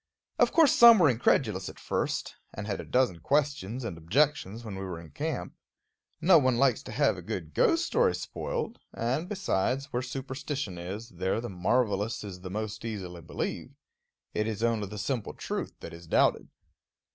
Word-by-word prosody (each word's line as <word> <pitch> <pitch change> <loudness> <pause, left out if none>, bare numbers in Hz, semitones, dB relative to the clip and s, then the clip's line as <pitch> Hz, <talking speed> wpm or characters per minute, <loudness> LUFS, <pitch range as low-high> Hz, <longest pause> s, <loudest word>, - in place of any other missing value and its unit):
Of - - +5
course 320 -5 +5
some 235 -1 +9
were 160 -8 +5
incredulous 110 -5 +1
at - - -11
first, - - -2 0.2
and 100 - -5
had 100 -2 -3
a - - -10
dozen 125 -10 +1
questions 135 - 0
and 95 -8 -5
objections 115 - +1
when 105 - -6
we 95 - -5
were 90 -3 -5
in 80 -2 -12
camp. - - -3 0.7
No 175 -2 +6
one 130 -3 +2
likes 130 -3 +3
to - - -9
have - - +2
a - - -8
good 80 -4 -5
ghost 335 0 +3
story 480 -1 +2
spoiled; 470 - -4
and, 130 +10 -1
besides, 140 - -1
where 125 - 0
superstition 130 - -4
is, 100 +7 -6
there 95 +1 -1
the 120 +1 -5
marvelous 105 +3 0
is 95 -3 -7
most 105 +3 -5
easily 95 -6 -5
believed. 80 - -4 0.6
It 105 0 0
is 110 0 -3
only 115 -3 +1
the 105 +2 -8
simple 105 +2 -3
truth - - -4
that 85 - -8
is 85 0 -11
doubted. - - +2
115 Hz, 175 wpm, -29 LUFS, 95-135 Hz, 0.7 s, some